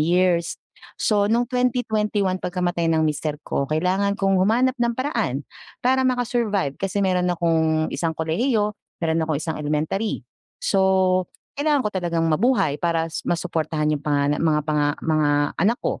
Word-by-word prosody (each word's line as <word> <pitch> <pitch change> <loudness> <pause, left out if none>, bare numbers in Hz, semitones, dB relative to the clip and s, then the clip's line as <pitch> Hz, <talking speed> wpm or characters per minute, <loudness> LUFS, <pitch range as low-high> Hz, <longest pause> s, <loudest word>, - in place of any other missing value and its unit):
years. 170 +1 +2 0.4
So, 205 -2 +2
no'ng 240 +2 +2
2021 215 -6 0
pagkamatay 175 -2 -1
ng 160 -1 +2
mister 150 0 -2
ko 140 - -1
kailangan 185 +6 +1
kong 195 -1 +2
humanap 245 +6 +3
ng 235 0 +1
paraan 230 - -1 0.4
para 260 +1 +3
maka-survive, 235 - 0
kasi 195 +1 -2
meron 180 -1 +1
akong 160 -2 +1
isang 165 -1 -1
kolehiyo, 210 +7 0 0.3
meron 160 0 +1
akong 155 -3 0
isang 160 0 -3
elementary. 155 +7 -1 0.4
So, 190 -1 +3 0.3
kailangan 290 -3 +1
ko 210 - 0
talagang 170 -3 -1
mabuhay 160 - +2
para 165 -1 +1
s - - -4
masuportahan 160 -3 -1
'yong 145 -1 -2
pangana 145 -1 +1
mga 155 -2 +2
panga 150 -1 +1 0.2
mga 155 -2 +2 0.3
anak 230 +5 +2
ko. - - -3
180 Hz, 145 wpm, -23 LUFS, 160-210 Hz, 0.4 s, humanap